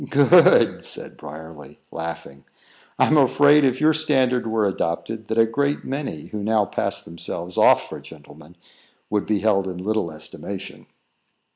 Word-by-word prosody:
"Good!" 155 +4 +5
said - - -5
Briarly, 75 +1 -12
laughing. 80 -4 -7 0.5
"I'm 155 - +3
afraid, 145 +2 +4
if 130 -2 +1
your 155 +1 +3
standard 130 -6 +1
were 110 -1 0
adopted, 100 +4 -3
that 110 - -3
a 115 - +5
great 140 +5 -2
many, 135 - -5
who 105 - -6
now 110 -1 +1
pass - - -3
themselves 85 +1 -6
off - - +4
for - - -8
gentlemen, 80 +3 -15 0.5
would 105 -1 -1
be 105 -3 0
held 100 -3 +1
in 90 -1 -6
little 105 0 -2
estimation." 95 +5 -8
105 Hz, 145 wpm, -22 LUFS, 85-135 Hz, 0.5 s, Good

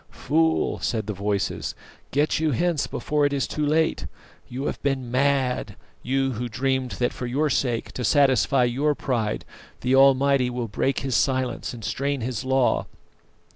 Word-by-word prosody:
"Fool," 160 +2 +2
said 110 -4 -1
the 105 - -3
voices, 100 0 -2 0.3
"get 145 +3 +1
you 160 -1 +1
hence 170 +4 0
before 150 -1 -1
it 145 - +3
is 140 - 0
too 150 - -3
late. 160 +2 +1 0.4
You 130 +3 -5
have - - -3
been 135 -4 -1
mad; 130 -1 +1 0.3
you 135 +1 0
who 120 0 -4
dreamed 130 +2 -1
that 120 - -1
for 125 - -5
your 145 +4 0
sake, 120 -3 -1
to 125 - -5
satisfy 135 0 +3
your 140 +5 +1
pride, 115 -7 -2 0.4
the 125 +1 +1
Almighty 135 -1 +5
will 120 -1 -3
break 130 +6 -1
His 135 -3 -1
silence 130 +2 0
and 115 -4 -8
strain 140 +2 -1
His 120 -2 -3
law. 130 -1 +1
130 Hz, 165 wpm, -24 LUFS, 120-140 Hz, 0.4 s, Almighty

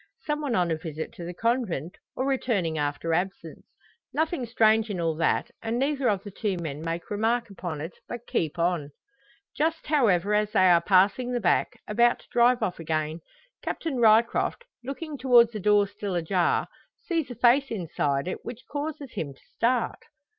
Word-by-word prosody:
Some 300 0 -2
one 275 -6 -1
on 175 -3 +1
a 160 - 0
visit 160 -1 -6
to 175 - -9
the 175 +1 -5
Convent, 225 - -1 0.2
or 260 - -1
returning 230 -11 0
after 150 +2 -1
absence. 190 +4 -3 0.5
Nothing 315 -5 -1
strange 220 -1 +3
in 195 -4 -3
all 165 -1 +1
that; 165 - +1
and 225 +1 -2
neither 275 0 +1
of 200 -2 0
the 205 - -8
two 195 -1 -2
men 155 -4 -5
make 165 +3 -4
remark 225 +2 0
upon 170 -5 -5
it, 165 +3 -6
but 240 0 -7
keep 160 -6 -1
on. 170 -4 0 0.7
Just 320 +2 0
however, 210 - +2
as 210 0 +1
they 185 -4 +5
are 170 -1 +5
passing 195 +7 +3
the 245 - +1
back, 180 -6 +1
about 240 +3 +3
to - - -24
drive 245 0 +4
off 180 -5 -2
again, 155 0 -2 0.4
Captain 315 -6 -3
Ryecroft, 230 - +3 0.2
looking 285 +3 -6
towards 240 -3 +6
the 215 - -5
door 205 +1 +4
still 200 -1 -5
ajar, 175 +1 +1 0.4
sees 330 -6 -1
a 245 - -6
face 260 +4 +4
inside 155 -7 -1
it 185 - -4
which 240 0 -8
causes 290 -2 -5
him 150 -9 -5
to - - -25
start. 240 +1 +1
210 Hz, 180 wpm, -26 LUFS, 170-245 Hz, 0.7 s, towards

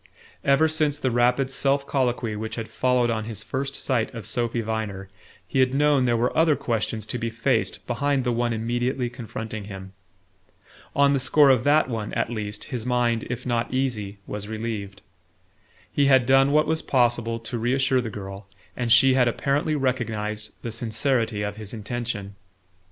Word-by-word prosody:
Ever 140 +3 +4
since 155 -2 +1
the 130 - 0
rapid 125 +3 +2
self 140 +1 +1
colloquy 125 -5 -1
which 110 +1 -5
had 115 -1 -5
followed 125 -2 +1
on 110 -1 -2
his 110 -1 -5
first 140 +1 -3
sight 125 -5 0
of 115 -4 -6
Sophy 120 +2 -1
Viner, 105 -3 -4 0.4
he 135 - -1
had 130 0 +3
known 145 -2 +3
there 120 -1 +2
were 120 +2 0
other 160 -1 +4
questions 115 -3 -2
to 120 +3 -4
be 115 0 -2
faced 115 -3 -1
behind 140 +2 0
the 125 - 0
one 120 0 0
immediately 120 +2 -1
confronting 110 -3 -6
him. 95 -2 -9 1.0
On 140 0 +4
the 140 - +2
score 135 +2 +5
of 125 -3 +3
that 150 +1 +4
one, 110 -4 -4
at - - 0
least, 105 -2 -4
his 120 -3 -2
mind, 120 -2 0
if 120 0 -4
not 120 -2 -1
easy, 115 -7 -2
was 105 0 -5
relieved. 110 -3 -5 0.9
He 140 -1 +3
had 130 -2 +5
done 135 +2 +5
what 150 +1 +4
was 160 0 0
possible 120 -3 +1
to 115 +1 -5
reassure 130 +2 +2
the 115 - -4
girl, 100 -1 -8 0.3
and 120 -2 -2
she 130 +3 +7
had 130 -2 +4
apparently 140 +5 0
recognized 110 -6 -2
the 115 - -4
sincerity 115 -1 0
of 105 0 -4
his 110 +1 -7
intention. 110 -2 -4
120 Hz, 175 wpm, -24 LUFS, 110-135 Hz, 1.0 s, she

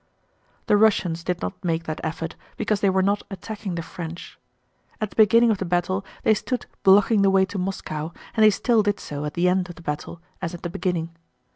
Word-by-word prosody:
The 210 - +4
Russians 185 -6 +2
did 180 0 -2
not 90 - -5
make 165 -2 0
that 155 -1 -5
effort 165 0 -4 0.2
because 210 -2 0
they 200 - +4
were 190 0 +2
not 200 +2 +1
attacking 195 0 -6
the 170 - -3
French. 170 +1 -8 0.6
At 215 -3 -2
the - - -16
beginning 230 +2 +6
of 205 - 0
the - - -1
battle 180 +2 0 0.2
they 220 - +5
stood 245 +3 -3 0.2
blocking 200 +2 +5
the 195 - +5
way 190 0 +4
to 190 +1 -5
Moscow 165 -4 -4 0.2
and 220 - +3
they 215 - +9
still 225 +2 +2
did 205 -1 0
so 145 0 -5
at 150 - -5
the 175 +1 +2
end 180 0 +1
of 175 - -8
the 165 - -14
battle 150 +2 -4 0.2
as 175 -1 -3
at 170 - -12
the 175 - -3
beginning. 170 -3 -2
185 Hz, 220 wpm, -24 LUFS, 170-205 Hz, 0.6 s, they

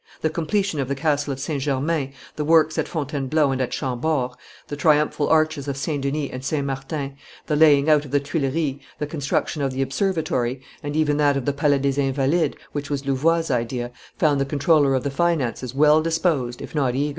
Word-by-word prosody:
The 160 - 0
completion 170 +1 -1
of 135 - -1
the 140 - -1
castle 145 0 0
of 135 - -4
St. 140 0 -3
Germain, 140 +1 -1 0.2
the 150 - -2
works 155 0 +3
at - - 0
Fontainebleau 145 -1 0
and 130 0 -1
at 125 - -1
Chambord, 130 0 -1 0.4
the 145 - -5
triumphal 150 0 +2
arches 155 -3 +2
of 140 -1 -3
St. 145 0 -2
Denis 140 +1 -2
and 130 0 -6
St. 140 0 -1
Martin, 135 +1 -4 0.3
the 150 - 0
laying 150 -2 +5
out 150 -2 +5
of 145 - -10
the 145 +2 +2
Tuileries, 140 0 -1 0.2
the 150 - -2
construction 145 0 -2
of 135 -1 0
the 135 +1 0
Observatory, 135 -5 -1 0.2
and 145 0 -4
even 150 -2 +2
that 145 -2 +3
of 135 - -3
the 145 - +1
Palais 145 0 +2
des 140 +1 0
Invalides, 140 +4 +1 0.2
which 145 -1 -4
was 140 -1 -3
Louvois' 160 +4 +1
idea, 120 0 -2 0.3
found 145 -3 +2
the - - +1
comptroller 145 0 +3
of 130 - -1
the 140 - -2
finances 135 -6 -1
well 150 +2 +5
disposed, 160 -7 0
if - - -9
not 135 -5 +1
eager. 145 +2 0
145 Hz, 205 wpm, -23 LUFS, 135-155 Hz, 0.4 s, laying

